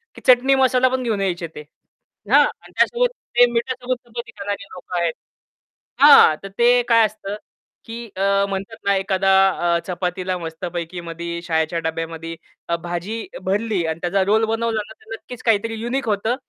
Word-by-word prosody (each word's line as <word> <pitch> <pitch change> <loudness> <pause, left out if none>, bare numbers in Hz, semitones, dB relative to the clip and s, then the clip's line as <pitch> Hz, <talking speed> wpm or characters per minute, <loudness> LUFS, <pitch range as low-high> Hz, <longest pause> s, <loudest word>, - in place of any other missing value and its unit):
की - - -12
चटणी 255 +2 +6
मसाला 260 -1 +3
पण 260 0 -2
घेऊन 215 -4 -1
यायचे 175 -3 -2
ते. 150 - -7 0.7
हां - - +8
आणि - - -8
त्यासोबत - - +3 0.3
ते 245 - +8
मिठासोबत 250 +2 -2
चपाती 235 +1 -7
खाणारे 200 0 -4
लोकं 180 0 -6
आहेत. 170 -2 0 0.9
हां, 280 - +8
तर 195 - -7
ते 245 +1 +5
काय 230 -1 +6
असतं 210 -1 -5 0.5
की 230 +1 -7
अ, 200 0 +2
म्हणतात 195 +3 -5
ना 200 0 +3
एखादा 195 0 +1 0.4
अ, - - +1
चपातीला 180 0 -2
मस्तपैकी 170 +1 -5
मधी 170 0 -5
शाळेच्या 160 0 0
डब्यामध्ये 165 0 -4 0.3
अ, 170 - +2
भाजी 175 +6 -4 0.2
भरली 200 -2 0
अन् 160 +1 -3
त्याचा 190 +2 +1
रोल 220 +3 +3
बनवला 225 0 -1
ना - - -12
तर 225 0 -12
नक्कीच 245 +1 -10
काहीतरी 225 0 +1
युनिक 245 +2 -2
होतं 215 +4 0
200 Hz, 165 wpm, -21 LUFS, 175-230 Hz, 0.9 s, हां